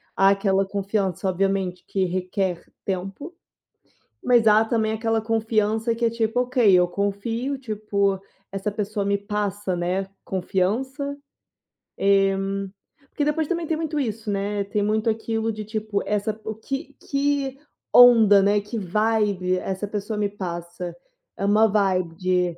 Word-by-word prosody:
Há 195 +1 +5
aquela 195 0 +2
confiança, 195 -1 -1
obviamente, 190 -1 -1
que 190 -1 0
requer 185 0 -2 0.2
tempo, 195 - -4 0.9
mas 240 -2 +4
há 215 +1 +6
também 220 -1 0
aquela 225 0 0
confiança 225 0 0
que 235 +1 0
é - - +4
tipo: 230 +1 0
"Ok, 250 -5 +3
eu 180 -1 +5
confio, 205 +8 -2
tipo, 205 -5 -1 0.3
essa 195 +2 -3
pessoa 205 0 -2
me 200 0 +2
passa, 205 -2 -2
né, 180 +2 -1 0.2
confiança". 255 - -2 1.9
E - - -29
porque 290 - -3
depois 300 +1 0
também 340 0 -1
tem 320 - 0
muito 315 -1 -3
isso, 225 -4 -3
né. 200 0 -1
Tem 205 +1 -1
muito 215 +2 +1
aquilo 225 0 -1
de, 215 0 -5
tipo, 215 -1 -2
essa 210 +1 -1
o 220 - -4
que 270 +5 -5
que 280 -1 -1 0.4
onda, 225 -5 +8
né, 205 +1 +3
que 210 +3 -6
vibe 205 -2 +1
essa 190 +2 -3
pessoa 210 +1 -4
me 205 - +2
passa. 175 -2 -6 0.4
É 200 - -2
uma 210 +2 +5
vibe 190 -5 +1
de 180 -1 0
210 Hz, 145 wpm, -24 LUFS, 195-225 Hz, 1.9 s, onda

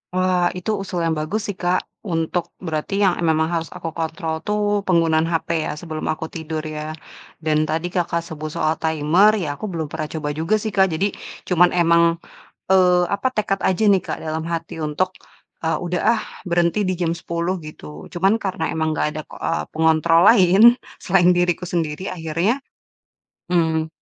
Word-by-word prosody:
Wah, 185 -1 +2
itu 180 +4 -2
usul 185 -2 -4
yang 160 - 0
bagus 175 +9 -2
sih 205 - -3
Kak, 180 +1 +2 0.3
untuk, 165 +1 -1 0.2
berarti 155 +3 -3
yang, 190 -2 +4
eee, - - -4
memang 160 0 +1
harus 165 -1 -2
aku 165 -2 -4
kontrol 160 0 -3
tuh 210 0 0 0.3
penggunaan 165 -3 +3
HP 165 - -1 0.2
ya - - -2
sebelum 160 -2 -6
aku 160 - -6
tidur 160 -1 -4 0.2
ya? 150 +1 -4 0.5
Dan 155 -1 +1
tadi 165 +2 -1
Kakak 170 -1 0
sebut 155 -2 -6
soal 155 +1 +1
timer, 160 +6 +4
ya - - -3
aku 180 - -6
belum 160 -3 -3
pernah 155 -1 -3
coba 155 -2 -3
juga 165 +7 +2
sih - - -2
Kak, 190 -1 +5
jadi 185 +6 +1 0.4
cuman 180 -1 +5
emang, 170 0 +5 0.7
eee, 180 -2 +5
apa, 200 +5 -2
tekad 205 -2 0
aja 190 +3 0
nih 195 - +5
Kak - - -3
dalam 160 0 -3
hati 165 0 -4
untuk, 170 +5 0 0.5
eee, 160 - +1
"Udah 175 0 -1
ah 225 - -2 0.3
berhenti 170 +2 +1
di 185 - +1
jam 170 -1 +1
10.00," 170 +2 -2
gitu. 75 - -10
Cuman 195 +5 +2
karena 190 -6 -4
emang 160 -1 -1
gak - - 0
ada, 155 0 -5
eee, 75 - -3
pengontrol 160 +1 +4
lain 190 -4 +5 0.4
selain 180 -2 +4
diriku 175 0 0
sendiri, 165 -2 -2
akhirnya, 175 - -1 0.8
mmm, 160 -2 +1
170 Hz, 175 wpm, -21 LUFS, 160-180 Hz, 0.8 s, Kak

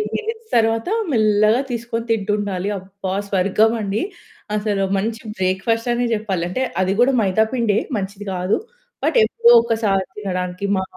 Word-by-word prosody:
Minutes 450 +1 -4
తరువాత 225 0 +2 0.2
మెల్లగా 215 0 +3
తీసుకొని 230 -1 -3
తింటుండాలి 205 -3 -1
అబ్బా! 190 0 -6 0.2
స్వర్గం 200 +4 +3
అండి. 205 +1 -1 0.5
అసలు 205 -2 0
మంచి 225 +3 -2 0.2
బ్రేక్‌ఫాస్టనే 230 +6 0
చెప్పాలి. 200 -5 -2
అంటే 255 +9 -1 0.2
అది 190 +1 +1
కూడా 265 +2 +4
మైదా 205 +2 +2
పిండే, 230 -5 +1 0.2
మంచిది 200 +1 -5
కాదు. 180 +2 +1 0.5
బట్, 315 - +2
ఎప్పుడో 235 +1 +4
ఒక్కసారి 220 -5 0
తినడానికి 185 -1 -3
మా 190 - 0
210 Hz, 130 wpm, -20 LUFS, 195-230 Hz, 0.5 s, కూడా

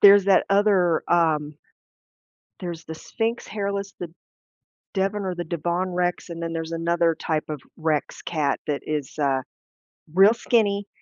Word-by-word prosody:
there's 200 -1 +8
that 195 -1 +5
other, 195 -4 +3
um 155 -3 +2 1.0
there's 175 -3 -5
the 160 - -6
Sphinx 225 +7 -3
hairless, 200 -1 -3
the 170 -2 -6 0.8
Devon 195 +1 0
or 185 -1 -2
the 175 0 -4
Devon 175 +3 -1
Rex, 180 0 -1
and 170 0 -6
then 165 0 -3
there's 165 0 -4
another 170 0 +2
type 155 -1 -2
of 150 -2 -4 0.2
Rex 155 -2 -1
cat 150 -4 -1
that 145 -2 -2
is, 150 -3 -3
uh, 135 -3 +1 0.7
real 195 +4 +7
skinny, 205 -4 +1
175 Hz, 145 wpm, -24 LUFS, 160-200 Hz, 1.0 s, there's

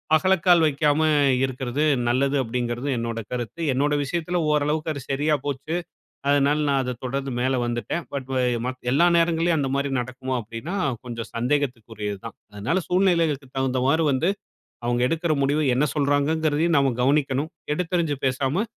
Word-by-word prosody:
அகலக்கால் 180 0 +4
வைக்காம, 150 +1 +2 0.4
இருக்கிறது 130 +2 -2 0.3
நல்லது 135 +3 +1
அப்டிங்கிறது 120 +2 -3
என்னோட 115 0 -3
கருத்து. 125 +6 -4
என்னோட 145 +3 +1
விஷயத்தில 170 +5 -2
ஓரளவுக்கு 150 +2 0
அது 140 - -6
சரியா 150 +3 +2
போச்சு. 145 +3 -3 0.5
அதனால 145 +1 +3
நான் 140 -1 +2
அத 125 -1 -3
தொடர்ந்து 135 +2 -2
மேல 130 +1 +1
வந்துட்டேன். 120 +8 -3
பட் 135 -2 -4
வ - - +1 0.3
மத் 130 0 -4
எல்லா 170 +6 +4
நேரங்கள்லையும் 165 0 +2
அந்தமாரி 140 0 -1
நடக்குமோ 130 +1 -4
அப்டின்னா, 115 - -6 0.3
கொஞ்சம் 115 -1 -5
சந்தேகத்திற்கு 125 -2 -1
உரியது 105 -2 -4
தான். 115 - -8 0.2
அதனால 140 - -1
சூழ்நிலைகளுக்கு 165 -8 +1
தகுந்தமாரி 130 +4 +1
வந்து 160 +8 +1 0.6
அவுங்க 120 0 +1
எடுக்கிற 165 0 0
முடிவு 145 +3 +1
என்ன 140 +4 +3
சொல்றாங்கிறதையும் 150 +3 +1
நம்ம 135 -2 +3
கவனிக்கணும். 140 +2 +1 0.2
எடுத்தெரிஞ்சு 165 -3 -1
பேசாம, 135 - 0
140 Hz, 140 wpm, -24 LUFS, 130-155 Hz, 0.6 s, அகலக்கால்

